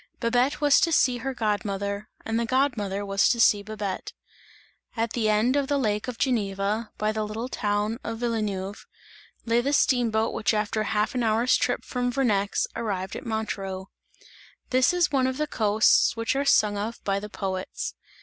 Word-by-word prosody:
Babette 245 +5 +1
was 290 -2 +5
to 335 - +2
see 255 -5 +3
her 265 +2 -4
god 215 -1 0
mother, 200 0 -4 0.2
and 225 +1 0
the 235 - 0
god 260 +2 +2
mother 200 -1 -3
was 195 0 +2
to 235 - +1
see 210 -2 +5
Babette. 205 -2 -5 0.8
At 230 0 -1
the 220 -3 +1
end 215 +5 +2
of 280 -1 +1
the 285 0 +1
lake 210 -5 -1
of 250 -2 -5
Geneva, 210 -3 -1
by 215 0 0
the 215 0 -2
little 215 +3 -4
town 210 -1 -1
of 225 0 -4
Villeneuve, 210 -4 -3 0.6
lay 235 +1 +2
the 280 +4 -1
steam 245 -4 +3
boat 220 +1 0
which 215 +1 0
after 210 +1 0
half 215 0 0
an 250 - -1
hour's 230 +2 +3
trip 250 0 0
from 245 -1 -1
Vernex, 215 -6 +1
arrived 195 -5 -3
at 255 - -7
Montreux. 195 -4 -4 0.8
This 255 +5 +4
is 350 -4 +2
one 265 -2 +2
of 260 0 -2
the 305 - 0
coasts 220 -3 +3
which 230 +3 0
are 280 +1 0
sung 210 -6 +3
of 225 +3 -4
by 195 0 0
the 210 +1 -8
poets. 190 - -4
220 Hz, 190 wpm, -26 LUFS, 205-250 Hz, 0.8 s, was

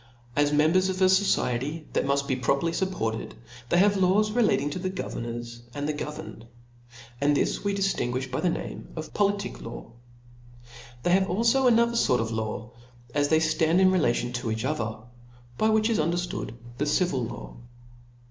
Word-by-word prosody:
As 145 0 +3
members 160 +6 +3
of 185 0 -2
a 190 - +5
fociety 160 -6 +1
that - - 0
muft 140 0 +1
be 130 - +1
properly 140 +6 +1
fup 190 +3 -1
ported, 115 -9 -3 0.3
they 175 - +3
have 200 +2 +5
laws 195 +3 +3
relative 210 - +2
to 185 - -4
the 185 +1 -2
governors 120 -9 -5
aiid 145 - -3
the 150 - -1
governed, 150 -5 -7 0.7
and 145 0 +3
this - - 0
we 200 -1 0
diftingoifh 130 -10 -1
by 130 - -2
the 180 - +2
name - - -5
of 155 -1 -7
joliiic 200 -1 0
law. 115 0 -8 1.1
They 175 - +2
have 190 +1 +4
alfo 230 +7 +3
another 235 0 +4
fort 125 - +3
of 115 0 -2
laws, 110 0 -4 0.4
as 145 0 +2
they 160 - +5
ftand 160 +1 +2
in 190 0 +5
relation 120 -8 +1
to 120 -1 -3
each 110 +2 -2
other; 110 -6 -2 0.6
by 220 - +3
which 220 0 +3
is 230 -2 +1
underftood 170 -7 -2 0.2
the 150 - 0
civil 150 -4 +1
law 115 - -7
155 Hz, 175 wpm, -26 LUFS, 125-190 Hz, 1.1 s, a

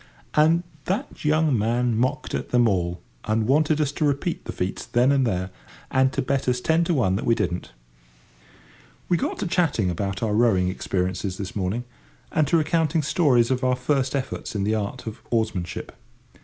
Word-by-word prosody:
And 160 +3 +4 0.2
that 190 +3 -3
young 155 -2 +3
man 120 +2 +1
mocked 130 +6 -1
at - - -3
them 120 -1 +4
all, 90 -3 -1 0.2
and 110 0 +1
wanted 150 +4 +3
us 145 -2 +1
to 145 - -3
repeat 145 +4 -1
the - - -4
feats 90 +1 -3
then 125 +3 +2
and 135 -3 +3
there, 95 -2 -2 0.4
and 130 0 +3
to - - -1
bet 135 0 -1
us 125 0 +1
ten 160 +6 +2
to 175 - +1
one 95 -9 +2
that - - -4
we 115 - +4
didn't. 90 - -2 1.4
We 175 - +4
got - - -2
to - - -3
chatting 155 - +1
about 100 +5 -3
our 110 -2 0
rowing 105 -5 +3
experiences 95 0 -2
this 95 -1 -6
morning, 100 +4 -1 0.5
and 155 -5 +2
to 165 - +3
recounting 160 0 +1
stories 135 -6 +3
of 130 0 0
our 130 0 +3
first 130 +1 0
efforts 130 -4 -4
in 100 - 0
the 105 +2 +1
art 110 +4 -3
of 110 -2 -7
oarsmanship. 110 -7 -2
125 Hz, 185 wpm, -24 LUFS, 100-150 Hz, 1.4 s, And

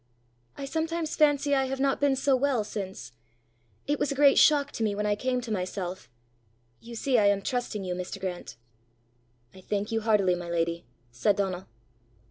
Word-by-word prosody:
"I 280 - -5
sometimes 320 +2 -2
fancy 290 -2 +3
I 270 -1 +3
have 265 0 -4
not 275 +1 +1
been 285 -2 +3
so 270 0 +2
well 260 -3 +1
since. 190 - -6 0.7
It 290 0 -1
was 280 - 0
a - - -2
great 280 0 +6
shock 285 -2 +4
to 225 - -3
me 210 -2 0
when 210 +1 -2
I 210 - +2
came 250 +3 -1
to 235 -2 -7
myself: 185 - -4 0.7
you 235 +1 -10
see 250 +1 +2
I 205 - +4
am 200 -1 +2
trusting 240 -4 -2
you, 180 -1 -3
Mr. 180 +2 -5
Grant!" 180 -8 -5 1.0
"I 190 - -13
thank 205 +3 -3
you 225 0 0
heartily, 210 -4 +3
my 175 -1 -5
lady," 170 0 -1 0.3
said 125 +12 +1
Donal. 190 -2 -2
220 Hz, 185 wpm, -27 LUFS, 190-275 Hz, 1.0 s, great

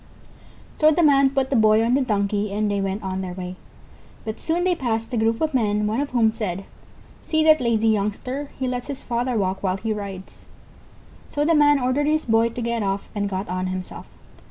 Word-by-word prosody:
So 310 - +5
the 315 +2 +2
Man 275 -2 +5
put 270 0 -1
the - - +2
Boy 220 -1 +4
on 235 - +1
the 275 - +3
Donkey 205 -3 0
and 210 +1 0
they 200 -1 0
went 195 +2 -3
on 190 0 -3
their 180 -1 -5
way. 180 0 -6 0.7
But 220 0 -5
soon 335 +2 0
they 365 0 +2
passed 230 -7 -2
a - - +1
group 225 +1 +1
of 315 -2 0
men, 210 -4 +1
one 215 +4 0
of 285 - -3
whom 230 -3 +3
said: 195 -4 -4 0.6
"See 315 -1 +1
that 310 -2 +5
lazy 225 -2 +2
youngster, 220 +7 -2
he 265 - -2
lets 250 -1 -3
his 280 -2 -6
father 240 0 -1
walk 190 -1 -1
while 185 -1 0
he 220 +2 -2
rides." 195 -2 -8 0.8
So 295 0 -1
the 330 - +3
Man 290 -2 +5
ordered 255 +3 0
his 310 +1 +1
Boy 225 0 +3
to 235 +1 -6
get 235 -1 -1
off, 195 0 -2
and 205 -1 -2
got 190 +1 -3
on 185 +1 -2
himself. 185 0 -6
225 Hz, 215 wpm, -23 LUFS, 200-270 Hz, 0.8 s, So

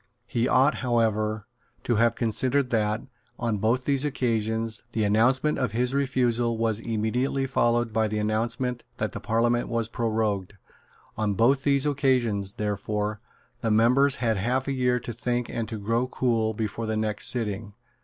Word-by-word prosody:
He 120 +1 0
ought, 135 +3 +4
however, 110 -3 0 0.4
to 120 - +1
have 115 +1 +3
considered 125 +4 +1
that, 105 0 0 0.3
on 115 -4 -1
both 120 +5 +1
these 140 -1 +1
occasions, 115 -5 -1
the 110 - 0
announcement 125 +9 +2
of 125 -6 -1
his 125 +2 +1
refusal 120 -4 +1
was 110 -2 0
immediately 115 +5 -1
followed 120 -3 +1
by 110 -1 +2
the 105 0 -3
announcement 115 +3 -1
that - - -2
the - - -6
Parliament 120 +2 +1
was 115 -1 -1
prorogued. 110 -5 -1 0.6
On 105 -2 0
both 130 +6 +3
these 140 -1 +3
occasions, 125 -9 +1
therefore, 105 0 -2 0.4
the 115 - 0
members 125 +6 +4
had 115 -3 0
half 125 +7 0
a 140 - 0
year 125 -1 +1
to 120 0 -6
think 120 +1 -2
and 115 -2 -3
to 110 - -4
grow 115 +4 0
cool 115 -4 0
before 110 +1 -3
the 110 0 -1
next 110 -1 0
sitting. 105 -3 -1
115 Hz, 160 wpm, -26 LUFS, 110-125 Hz, 0.6 s, ought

